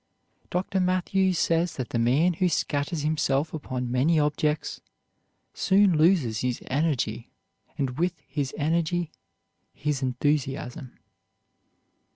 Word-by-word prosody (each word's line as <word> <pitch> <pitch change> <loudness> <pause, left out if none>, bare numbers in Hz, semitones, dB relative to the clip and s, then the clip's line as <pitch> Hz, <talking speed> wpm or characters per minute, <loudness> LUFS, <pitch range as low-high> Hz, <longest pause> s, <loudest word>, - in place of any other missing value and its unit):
Dr. 190 +2 -1
Mathews 185 0 +1
says 165 +1 +1
that 130 -3 -4
the 120 - -1
man 140 +10 +3
who 180 +2 +1
scatters 145 0 -1
himself 150 -1 0
upon 125 -5 -4
many 150 +6 +3
objects 150 +1 0 0.7
soon 195 -2 +3
loses 155 - +3
his 125 +1 -1
energy, 130 -6 -1 0.5
and 135 -2 -2
with 175 -1 0
his 140 -1 -2
energy 165 +2 0 0.6
his 145 -1 -2
enthusiasm. 130 0 -2
150 Hz, 110 wpm, -26 LUFS, 130-170 Hz, 0.7 s, man